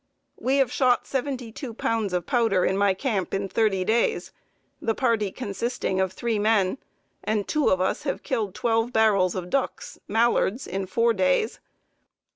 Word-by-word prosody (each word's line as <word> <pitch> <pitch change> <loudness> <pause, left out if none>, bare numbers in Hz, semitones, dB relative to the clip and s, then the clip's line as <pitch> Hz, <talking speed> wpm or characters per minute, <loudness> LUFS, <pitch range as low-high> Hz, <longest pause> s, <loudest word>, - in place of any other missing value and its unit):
We 265 +2 +1
have 270 -3 +2
shot 255 -2 +2
seventy 260 -3 -3
two 235 0 -7
pounds 225 -4 -1
of 180 -1 -1
powder 225 -8 +2
in 190 - +1
my 200 -1 +2
camp 195 -5 -2
in 195 0 -2
thirty 195 -3 +1
days, 230 +3 +1 0.5
the 225 - 0
party 225 -6 +1
consisting 230 -3 -3
of 190 -1 0
three 225 +2 -2
men; 210 +1 +2 0.4
and 215 -2 -1
two 305 -2 +1
of 185 - +2
us 185 - 0
have 275 - -3
killed 220 -7 -2
twelve 225 0 0
barrels 205 -6 +3
of 180 -1 -5
ducks 275 -1 -2
(Mallards) 230 +1 +1
in 190 +1 -4
four 230 +4 +2
days. 190 +3 +1
220 Hz, 165 wpm, -25 LUFS, 195-240 Hz, 0.5 s, barrels